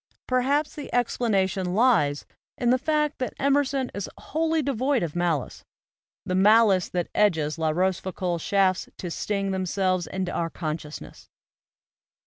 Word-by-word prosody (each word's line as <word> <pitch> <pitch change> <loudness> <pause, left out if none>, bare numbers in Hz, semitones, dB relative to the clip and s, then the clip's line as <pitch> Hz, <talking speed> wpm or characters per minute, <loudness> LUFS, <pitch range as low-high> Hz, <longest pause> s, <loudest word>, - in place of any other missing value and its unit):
Perhaps 270 +4 +1
the 290 - -8
explanation 195 -6 0
lies 205 - +3 0.3
in 240 -1 +2
the 255 - +3
fact 300 +1 0
that 255 - -3
Emerson 275 -2 +1
is 200 - -4
wholly 320 0 -1
devoid 265 -2 0
of 165 -2 -4
malice, 170 -6 -1 0.6
the 185 - -2
malice 200 -1 +4
that 175 -1 -3
edges 160 -6 +1
La 160 -1 +1
Rochefoucauld's 180 0 -1
shafts 190 -2 +1
to 175 - -5
sting 195 +2 -2
themselves 185 -1 0
into 190 -1 -3
our 165 -1 -2
consciousness. 155 -2 -7
195 Hz, 130 wpm, -25 LUFS, 175-255 Hz, 0.6 s, malice